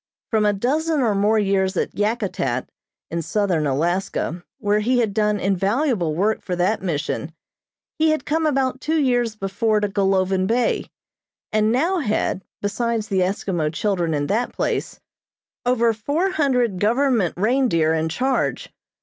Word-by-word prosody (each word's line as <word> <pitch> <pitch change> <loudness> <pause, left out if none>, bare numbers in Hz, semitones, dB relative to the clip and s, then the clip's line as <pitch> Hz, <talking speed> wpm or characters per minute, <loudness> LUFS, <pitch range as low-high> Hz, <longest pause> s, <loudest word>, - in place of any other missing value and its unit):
From 215 -2 +3
a 205 - +3
dozen 300 +9 0
or 225 -4 +2
more 205 +2 +2
years 195 -2 +1
at - - -1
Yakutat, 200 - -1 0.4
in 170 0 -1
southern 170 -2 0
Alaska, 175 +3 -1
where 205 0 +1
he 245 +4 +1
had 220 -4 +1
done 210 0 +1
invaluable 195 - 0
work 210 +6 +1
for 180 - -3
that 185 +5 +1
Mission, 160 -2 -2 0.7
he 315 0 +4
had 310 -3 0
come 315 +1 +1
about 265 -2 0
two 315 +1 0
years 245 -5 +1
before 210 +2 0
to 205 - 0
Golovin 190 -1 +1
Bay, 235 +2 0 0.6
and 215 0 +2
now 335 +10 +1
had, 210 - -1 0.2
besides 225 +1 -1
the 195 -2 +1
Eskimo 180 -4 -1
children 175 -2 0
in 145 0 -1
that 225 +10 -1
place, - - -2 0.7
over 235 -2 +3
four 290 - -1
hundred 250 - +1
government 230 - +2
reindeer 210 -7 +2
in 160 0 0
charge. 260 +10 -1
210 Hz, 150 wpm, -22 LUFS, 185-245 Hz, 0.7 s, he